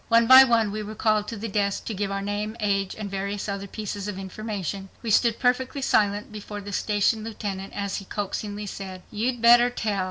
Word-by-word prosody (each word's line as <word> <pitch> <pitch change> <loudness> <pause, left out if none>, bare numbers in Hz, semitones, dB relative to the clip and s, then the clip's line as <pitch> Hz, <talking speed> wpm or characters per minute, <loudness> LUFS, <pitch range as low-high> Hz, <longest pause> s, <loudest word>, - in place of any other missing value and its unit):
One 230 0 +5
by 260 +2 +10
one 230 -5 +2
we 215 +1 -3
were 215 +1 -7
called 215 -1 +1
to 230 - -5
the 220 +3 -4
desk 200 -1 -1
to 225 - -3
give 200 0 -2
our 195 0 -3
name, 210 +2 -3
age, 195 -3 0
and 215 -2 -4
various 200 +1 -3
other 200 0 -4
pieces 205 -1 -5
of 205 -2 -4
information. 195 -1 -5
We 230 - -1
stood 230 +1 +3
perfectly 260 +2 0
silent 205 -2 +1
before 210 0 -7
the 200 0 -8
station 210 +2 +1
lieutenant 200 -3 -5
as 200 -1 -3
he 195 - -7
coaxingly 205 +1 -4
said, 190 -2 -7
"You'd 230 +2 -2
better 240 +1 +7
tell." 215 -4 -2
210 Hz, 210 wpm, -25 LUFS, 200-225 Hz, -, by